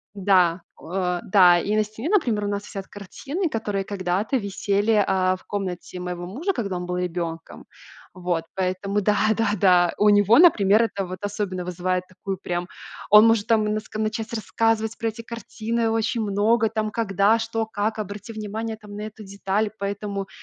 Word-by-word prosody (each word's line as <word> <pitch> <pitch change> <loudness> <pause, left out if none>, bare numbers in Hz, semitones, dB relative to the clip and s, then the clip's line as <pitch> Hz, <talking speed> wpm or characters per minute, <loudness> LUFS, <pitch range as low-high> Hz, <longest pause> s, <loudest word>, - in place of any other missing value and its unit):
Да, 185 -3 +3
о 180 0 -2
э, - - -5
да. 180 -3 +6
И 205 +4 -1
на 215 - +3
стене, 215 +8 -6
например, 240 - +1
у - - -1
нас 205 0 -2
висят 195 -1 -7
картины, 280 - -4
которые 210 -5 -2
когда-то 195 +5 -1
висели, 200 0 0
э, 190 -3 +2
в - - -22
комнате 185 -2 -5
моего 180 -1 -5
мужа, 310 - -2
когда 200 - -3
он 180 - -5
был 180 0 -3
ребенком. 170 -2 -4 0.5
Вот, 175 -3 -2
поэтому 190 +2 -1
да, 210 +1 +2 0.2
да, 225 0 +1
да. 180 -2 +4
У 210 - +4
него, 205 +2 +5
например, 220 - +6
это 200 -3 -2
вот 185 +1 -6
особенно 200 -3 -3
вызывает 180 +1 -1
такую 190 +1 -6
прям 175 -1 -3 0.4
Он 210 +1 +8
может 225 -2 +3
там 220 -2 +3
наск 215 0 -3
начать 220 +1 -2
рассказывать 225 0 0
про 230 - -1
эти 225 +1 -5
картины 230 0 -3
очень 225 +1 0
много, 215 +2 +2
там 215 -1 -2
когда, 210 0 +2
что, 225 0 -2
как, 215 +1 -2
обрати 210 +2 -6
внимание 220 +1 -5
там 210 -1 -12
на 210 - -6
эту 215 0 -8
деталь. 200 +1 -2
Поэтому, 200 0 -4
205 Hz, 175 wpm, -23 LUFS, 185-220 Hz, 0.5 s, Он